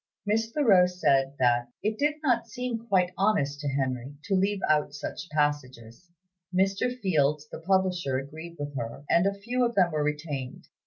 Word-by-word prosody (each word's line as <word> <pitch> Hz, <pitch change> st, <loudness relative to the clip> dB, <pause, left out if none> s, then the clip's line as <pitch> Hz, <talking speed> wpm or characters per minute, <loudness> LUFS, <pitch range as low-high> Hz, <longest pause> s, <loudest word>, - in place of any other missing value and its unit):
Miss 225 Hz, +2 st, +1 dB
Thoreau 210 Hz, -11 st, +5 dB
said 140 Hz, -6 st, +1 dB
that 120 Hz, -1 st, +2 dB, 0.2 s
"it 215 Hz, +1 st, -1 dB
did 295 Hz, +1 st, +2 dB
not 245 Hz, -5 st, +2 dB
seem 245 Hz, -2 st, -4 dB
quite 185 Hz, -4 st, +2 dB
honest 150 Hz, -9 st, +1 dB
to 145 Hz, -, -4 dB
Henry" 135 Hz, -1 st, -2 dB
to -, -, -2 dB
leave 195 Hz, +1 st, +1 dB
out 150 Hz, -1 st, +1 dB
such 150 Hz, +4 st, -6 dB
passages; 145 Hz, -2 st, -2 dB, 0.4 s
Mr. 195 Hz, +7 st, 0 dB
Fields, 150 Hz, -5 st, +1 dB
the -, -, -8 dB
publisher, 180 Hz, -6 st, +1 dB
agreed 160 Hz, +5 st, -8 dB
with 145 Hz, -1 st, -6 dB
her, 115 Hz, +2 st, -5 dB
and 170 Hz, +3 st, +4 dB
a 200 Hz, 0 st, -2 dB
few 245 Hz, +5 st, -1 dB
of 235 Hz, -1 st, 0 dB
them 180 Hz, -3 st, +4 dB
were 155 Hz, -1 st, 0 dB
retained. 150 Hz, -3 st, -4 dB
170 Hz, 170 wpm, -27 LUFS, 140-200 Hz, 0.4 s, Thoreau